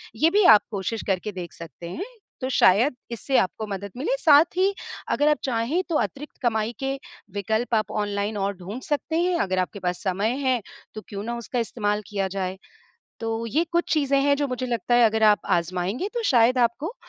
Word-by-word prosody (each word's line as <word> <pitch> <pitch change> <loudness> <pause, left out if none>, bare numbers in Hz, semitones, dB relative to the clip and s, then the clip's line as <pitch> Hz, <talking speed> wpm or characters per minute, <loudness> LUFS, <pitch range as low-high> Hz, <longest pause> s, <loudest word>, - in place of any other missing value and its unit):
ये 320 - +4
भी 415 0 +4
आप - - +3
कोशिश 210 +2 -3
करके 195 +2 -1
देख 180 -3 -7
सकते 170 +1 -10
हैं। 355 - -5 0.4
तो 260 - -2
शायद 245 +3 +4 0.2
इससे 260 +3 0
आपको 190 +4 -2
मदद 200 -1 -5
मिले। 350 - 0
साथ 300 -4 +7
ही 390 +2 +3 0.4
अगर 290 - +2
आप 300 - +3
चाहें, 255 +7 0
तो 330 - 0
अतिरिक्त 295 +2 -4
कमाई 220 -1 +1
के 270 0 -2 0.4
विकल्प 220 +4 0
आप 215 - 0
ऑनलाइन 205 0 -2
और 200 0 -1
ढूँढ 200 +8 -7
सकते 310 +2 -1
हैं। 360 0 +1
अगर 185 - 0
आपके 190 +2 -3
पास 180 -1 -2
समय 200 +6 0
है, 255 -3 +2 0.3
तो 215 - -5
क्यों 200 0 -5
ना 235 +1 -3
उसका 235 +1 -3
इस्तेमाल 210 -2 -1
किया 195 -2 -1
जाए। 190 -1 -3 0.6
तो 225 0 -2
ये 305 +9 +1
कुछ 345 0 +1
चीज़ें 280 -2 +2
हैं, 285 0 +4
जो 285 -1 -1
मुझे 255 0 -3
लगता 240 0 0
है, 240 - +6
अगर 220 0 0
आप 210 -1 +5 0.2
आज़माएँगे, 185 - -2
तो 475 - -1
शायद 245 +1 +4
आपको 250 - 0
230 Hz, 200 wpm, -24 LUFS, 200-275 Hz, 0.6 s, साथ